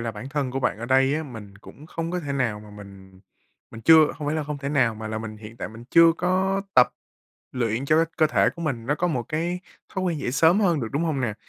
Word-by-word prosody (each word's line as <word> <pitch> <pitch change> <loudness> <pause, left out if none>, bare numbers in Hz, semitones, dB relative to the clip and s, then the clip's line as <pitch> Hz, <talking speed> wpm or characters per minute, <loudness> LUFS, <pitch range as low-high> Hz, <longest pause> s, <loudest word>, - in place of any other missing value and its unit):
là 115 0 -2
bản 110 +6 -8
thân 140 -2 -2
của 135 +1 -3
bạn 110 - 0
ở 115 - -5
đây 135 +2 +3
á, 155 - -2
mình 110 -8 -10
cũng 145 +7 -14
không 165 +1 -4
có 180 0 -2
thể 145 -3 -4
nào 120 -6 -1
mà 105 0 -13
mình 95 -2 -13 0.5
mình 115 - -10
chưa 160 +5 +6
không 150 - -5
phải 150 - 0
là 155 - -2
không 150 0 -5
thể 140 0 -4
nào, 130 -6 +2
mà 110 0 -5
mình 110 -1 -7
hiện 110 +2 -11
tại - - -5
mình 115 +2 -12
chưa 165 -1 +7
có 190 +3 0
tập 125 - +7 0.6
luyện 120 +1 -1
cho 155 +2 +3
cái 165 - +4
cơ 155 -2 +4
thể - - +2
của 170 - -6
mình 120 -7 -3
nó 145 - +1
có 180 +3 -1
một 130 -8 -1
cái 170 +3 -2 0.3
thói 190 - -3
quen 170 -4 -1
dậy 125 - -2
sớm 165 +8 +4
hơn 175 -7 +2
được, 115 - -3
đúng 145 - 0
hông 150 -5 -1
nè? 110 -4 -1
140 Hz, 270 wpm, -24 LUFS, 115-160 Hz, 0.6 s, chưa